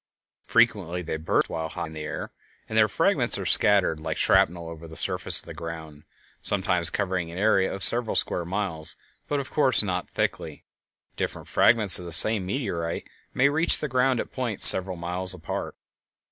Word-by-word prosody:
Frequently 100 -7 0
they 80 -1 -5
burst 80 - -1
while 80 -1 -6
high 85 +1 -7
in 80 - -12
the 80 - -9
air 75 - -7 0.4
and 110 - -8
their 110 -1 +3
fragments - - +1
are - - -7
scattered 100 -6 +2
like 80 0 -6
shrapnel 85 0 0
over 85 0 -11
the 80 - -13
surface - - +6
of - - -10
the - - -10
ground, 80 -3 -10 0.4
sometimes 90 -4 +1
covering 90 -3 -4
an 85 - -10
area 95 -1 0
of 95 - -3
several 120 -1 +1
square 90 - -1
miles, 85 -3 -4 0.3
but 145 - -3
of 135 - -8
course 130 -7 +1
not 90 -2 -5
thickly; - - -5 0.5
different - - -6
fragments 105 -6 +4
of 90 - -10
the 85 - -9
same 105 -2 +3
meteorite 90 -7 -5 0.3
may 130 - +2
reach 160 +4 +4
the 150 - -5
ground 130 -1 -1
at - - -6
points 120 -6 +3
several 95 -1 +6
miles 90 +2 -1
apart. 85 - -7
90 Hz, 180 wpm, -23 LUFS, 85-110 Hz, 0.5 s, surface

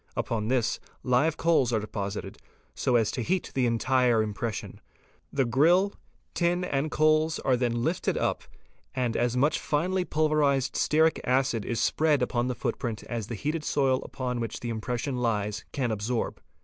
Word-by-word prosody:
Upon 110 -2 -2
this 120 -2 +1 0.2
live 130 +6 +2
coals 160 -7 +3
are 110 - +2
deposited 100 -1 -5 0.3
so 125 - 0
as 115 -3 +3
to 125 - -3
heat 185 +9 -1
the 130 -2 +2
entire 120 -1 +2
impression. 110 +1 -4 0.5
'The 135 -2 +1
grill, 170 +11 +3 0.4
tin, 175 +1 +1
and 145 -3 -1
coals, 155 +1 +3
are 130 - +1
then 120 -1 0
lifted 165 +5 0
up - - 0 0.5
and 125 -3 0
as 120 +1 +1
much 145 +5 +2
finely 180 +5 0
pulverized 150 -5 +1
stearic 160 +1 +3
acid 125 -4 +1
is 120 -2 -2
spread 155 +3 +2
upon 120 -1 0
the 125 - -2
footprint 115 -1 -3
as 115 -4 -4
the 115 - -4
heated 150 +6 -2
soil 135 -3 +1
upon 125 -2 -4
which 115 -1 -4
the 120 - -3
impression 125 +4 -3
lies 105 -3 -1
can 125 -4 -1
absorb. 110 +3 -2
125 Hz, 160 wpm, -27 LUFS, 115-150 Hz, 0.5 s, coals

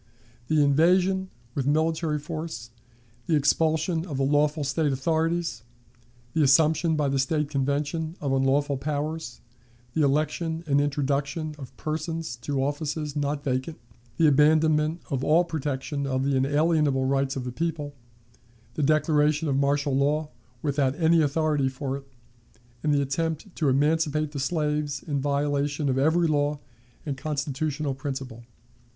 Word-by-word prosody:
the 155 -1 +3
invasion 180 +6 +3 0.2
with 135 -2 -2
military 160 +1 +1
force, 150 -6 -6 0.6
the 165 - +3
expulsion 160 +3 +2
of 145 -5 -4
the 135 - +1
lawful 145 +2 +2
State 145 +2 0
authorities, 160 -1 0 0.7
the 160 - +2
assumption 155 +3 +4
by 150 -2 +1
the 135 0 0
State 150 +2 0
Convention 145 +4 -1
of 140 -2 -1
unlawful 135 +2 +2
powers, 150 -1 -4 0.5
the 160 - +1
election 155 +3 0
and 145 -2 +3
introduction 145 +2 -1
of 130 -3 -10
persons 160 -1 -3
to 135 +2 -2
offices 150 +1 -3
not 145 0 -1
vacant, 130 +4 -2 0.4
the 165 - +4
abandonment 155 +2 +4
of 135 -2 -1
all 160 +5 +4
protection 145 -3 -3
of 130 0 0
the 140 0 +1
unalienable 145 0 +2
rights 135 0 0
of 130 - -3
the 125 - -4
people, 150 0 -3 0.8
the 150 - -3
declaration 150 +1 +2
of 140 - +1
martial 140 0 +1
law 150 +3 +1 0.3
without 140 -2 +1
any 165 0 +4
authority 150 -2 +1
for 135 +1 -4
it, 135 0 -9 0.7
and 150 - +1
the 140 -1 +3
attempt 160 +6 -3
to 150 -4 +1
emancipate 155 +2 +1
the 145 - -5
slaves 150 -1 -1
in 145 -3 -1
violation 145 +1 0
of 130 0 +1
every 160 +5 +3
law 145 -1 +1 0.5
and 140 -3 -3
constitutional 145 0 -2
principle. 130 -3 -6
145 Hz, 140 wpm, -26 LUFS, 140-155 Hz, 0.8 s, assumption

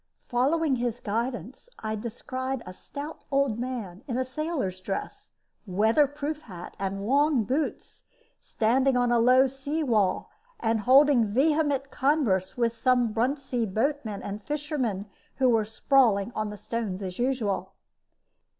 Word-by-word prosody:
Following 275 +3 +2
his 240 -1 -2
guidance, 235 - -4
I 215 0 -4
descried 255 +4 -4
a 185 - -8
stout 290 +10 -8
old 275 -5 +1
man, 235 -6 -5
in 245 -3 -2
a 260 - 0
sailor's 260 - -3
dress, 205 - -5 0.3
weather 220 +10 +3
proof 295 +2 -4
hat, 180 - -10
and 195 0 -3
long 280 0 +3
boots, 270 +9 -3 0.4
standing 255 +4 +2
on 245 -1 +2
a 240 - +4
low 255 +3 +6
seawall, 270 -6 0 0.3
and 225 -1 +1
holding 260 0 +5
vehement 280 +3 +1
converse 250 - +1
with 235 -1 +1
some 245 -2 +2
Bruntsea 250 0 0
boatmen 220 0 -1
and 205 +1 -5
fishermen 285 - -2 0.3
who 260 -1 +3
were 225 -3 +3
sprawling 225 -2 +3
on 215 -1 -2
the 210 - -7
stones 210 -2 -4
as 185 +1 -6
usual. 245 -6 -1
245 Hz, 135 wpm, -27 LUFS, 215-275 Hz, 0.4 s, low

